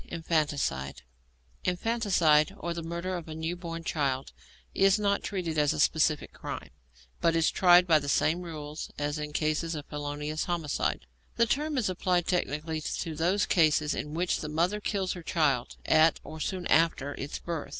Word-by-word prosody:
INFANTICIDE 145 - -1 0.6
Infanticide, 180 -4 +2
or 170 -3 -3
the 170 - -5
murder 170 +3 -4
of 170 - -8
a 155 - -6
new 160 +2 -3
born 165 -2 -6
child, 135 -5 -1 0.4
is 195 +1 +4
not 200 -1 +1
treated 170 -6 -2
as 150 -1 +3
a - - -5
specific 155 0 +2
crime, - - -7 0.5
but 165 0 +2
is 165 -1 +3
tried 180 -1 +6
by 160 -3 +5
the 145 -1 -5
same 165 +5 +2
rules 155 -3 -6
as 145 +1 -2
in 150 0 -4
cases 155 +2 -1
of 150 -1 -6
felonious 150 +1 -4
homicide. 165 - -1 0.3
The 235 - +5
term 295 +4 -1
is 240 - +1
applied 180 -1 0
technically 160 -2 -1
to 160 +1 -3
those 175 +6 +1
cases 155 -3 +3
in 150 +1 -5
which 175 +2 0
the 155 - -5
mother 175 +7 0
kills 195 -3 -1
her 180 - -8
child 145 -7 0
at, 160 +1 +4
or 155 0 -9
soon 185 +2 -3
after, 155 -4 +2
its 140 +1 -5
birth. 165 -3 -5
165 Hz, 170 wpm, -29 LUFS, 150-180 Hz, 0.6 s, tried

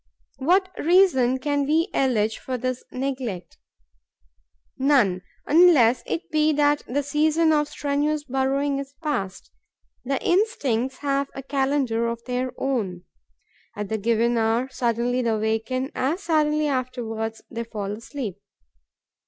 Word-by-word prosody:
What 370 +7 +3
reason 295 -8 +4
can 285 +1 -1
we 320 +4 +2
allege 225 -5 +1
for 255 -1 -4
this 255 +1 -3
neglect? 255 -9 -4 1.2
None, 255 -10 +3 0.2
unless 295 -8 +5
it 335 - -3
be 310 0 +3
that 290 0 +2
the 285 +4 -1
season 310 +3 +2
of 295 -1 +2
strenuous 295 +1 -1
burrowing 275 +1 0
is 275 0 -8
past. 195 -11 -3 0.5
The 270 +1 -1
instincts 270 - +1
have 275 0 0
a 270 - -6
calendar 265 -4 0
of 235 0 -4
their 250 0 -2
own. 205 -10 -2 0.7
At 210 -1 -4
the 220 - -1
given 235 +2 +1
hour, 225 +3 +1
suddenly 245 0 0
they 235 - 0
awaken; 225 +5 -1
as 315 +10 -1
suddenly, 305 -2 +2
afterwards, 240 -5 -3
they 235 0 -3
fall 210 -3 -5
asleep. 225 -1 -6
265 Hz, 130 wpm, -24 LUFS, 230-290 Hz, 1.2 s, unless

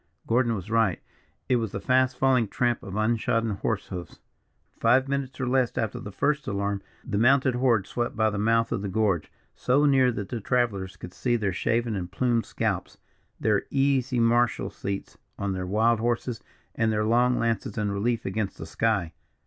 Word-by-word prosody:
Gordon 120 0 +2
was 100 +1 -7
right; 115 -5 +2 0.5
it 125 - +3
was 115 -3 -3
the - - -3
fast 130 0 +2
falling 130 -4 +3
tramp 120 +3 0
of 95 0 -7
unshodden 110 -1 0
horse - - -2
hoofs. 90 -2 -7 0.6
Five 130 +4 +4
minutes, 140 -1 -3
or 130 - -1
less, 125 -2 +1
after 110 -2 -1
the 100 - -7
first 150 +9 0
alarm, 100 0 -1 0.2
the 100 - -1
mounted 130 +2 +4
horde 120 -5 +2
swept 120 +3 -3
by 110 -1 +2
the 100 - -3
mouth 115 +2 +2
of 115 -4 -1
the 100 - -3
gorge, 100 -4 0 0.2
so 140 +4 +2
near 135 -3 +4
that 105 -4 -5
the 120 -3 -4
travellers 105 -6 -1
could 90 - -9
see 120 +4 0
their 100 -5 -1
shaven 115 +3 0
and 90 -2 -4
plumed 120 +2 0
scalps, - - -2 0.4
their 105 -3 +1
easy 135 -2 +1
martial 120 0 +2
seats 100 0 -5 0.2
on 100 -1 -2
their 90 -1 -4
wild 110 +4 +2
horses, 120 0 -1 0.3
and 115 -1 +1
their 105 0 0
long 120 +2 +3
lances 115 -2 -1
in 105 -2 0
relief 115 +4 -1
against 95 +1 -2
the - - -7
sky. 95 -2 0
115 Hz, 185 wpm, -26 LUFS, 100-125 Hz, 0.6 s, Five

